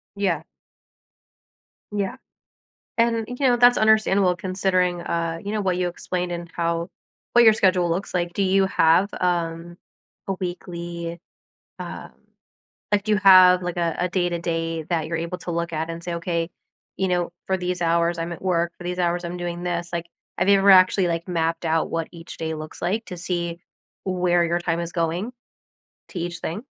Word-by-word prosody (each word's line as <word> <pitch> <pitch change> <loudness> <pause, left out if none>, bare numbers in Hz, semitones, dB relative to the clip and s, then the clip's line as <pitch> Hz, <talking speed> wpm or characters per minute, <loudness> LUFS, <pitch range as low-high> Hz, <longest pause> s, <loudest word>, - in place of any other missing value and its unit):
Yeah. 180 -6 0 1.5
Yeah. 200 -2 -2 0.8
And, 230 -1 +2
you 250 - -5
know, 245 -1 +4
that's 245 0 +6
understandable 200 -4 +3
considering, 185 -1 0
uh, 165 -1 -2
you 205 - -3
know, 215 - 0
what 185 -3 0
you 180 - +1
explained 180 0 -3
and 170 -1 -6
how 170 0 -1 0.4
what 240 0 +6
your 220 - +8
schedule 185 -4 +3
looks 185 +4 -2
like. 175 -1 0
Do 200 - 0
you 195 0 +3
have, 170 +2 +4
um, 170 -1 -1 0.5
a 195 - 0
weekly, 170 -2 -5 0.6
um, - - -7 0.8
like, 205 -1 +3
do 215 - -2
you 210 - +3
have, 185 -2 +7
like, 180 0 -3
a 170 -2 0
a 180 - 0
day-to-day 170 -2 -1
that 165 -1 -1
you're 165 - -2
able 170 +2 -4
to 175 - -6
look 170 0 -2
at 160 +1 -2
and 165 0 -6
say, 175 - -3
"Okay, 170 0 -2 0.5
you 190 -1 0
know, 175 -1 0 0.2
for 190 - +1
these 180 -1 -3
hours, 170 +1 +2
I'm 165 +1 -3
at 170 - -8
work. 170 -2 +1
For 175 - -10
these 180 0 -3
hours, 175 0 0
I'm 175 +1 -4
doing 175 0 -4
this," 175 -1 -2
like, 170 0 -3 0.3
have - - +1
you 200 -1 +6
ever 200 +1 +5
actually, 185 -1 +6
like, 170 0 -2
mapped 165 -1 -1
out 160 0 +1
what 165 -1 -2
each 165 0 -10
day 160 0 -3
looks 155 0 -8
like 210 +6 -1
to 180 - -7
see 170 -1 -3 0.4
where 180 -2 +2
your 170 +1 0
time 170 -1 -1
is 170 0 -4
going 170 +7 -1 0.8
to 180 - -6
each 175 +1 -4
thing? 210 - -5
175 Hz, 185 wpm, -23 LUFS, 170-185 Hz, 1.5 s, your